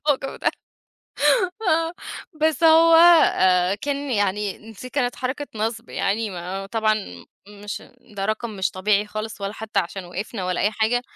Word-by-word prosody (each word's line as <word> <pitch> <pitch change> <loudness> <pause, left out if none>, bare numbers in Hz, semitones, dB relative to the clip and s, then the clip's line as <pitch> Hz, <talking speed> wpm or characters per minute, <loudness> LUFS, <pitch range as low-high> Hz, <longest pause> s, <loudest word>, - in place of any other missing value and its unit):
الموضوع 280 -2 -1
ده - - +1 1.1
آه. 330 -4 +1 0.5
بس 315 +1 +1
هو 325 0 +7 0.9
كان 285 -1 -3
يعني 205 -2 0
نسي 225 +3 -11
كانت 250 -3 -1
حركة 265 +3 -4
نَصْب 225 +2 -3
يعني، 210 +2 -1
ما 185 +2 -5
طبعًا 215 0 +1 0.5
مش 205 0 -8 0.2
ده 195 -2 -6
رقم 220 +3 -2
مش 190 - 0
طبيعي 200 +2 +1
خالص 215 0 -6
ولا 200 +1 -3
حتّى 220 -2 -2
عشان 185 +1 -5
وقفنا 185 +2 -5
ولا 180 -1 -1
أي 205 - +2
حاجة. 225 +3 +1
215 Hz, 145 wpm, -23 LUFS, 200-260 Hz, 1.1 s, هو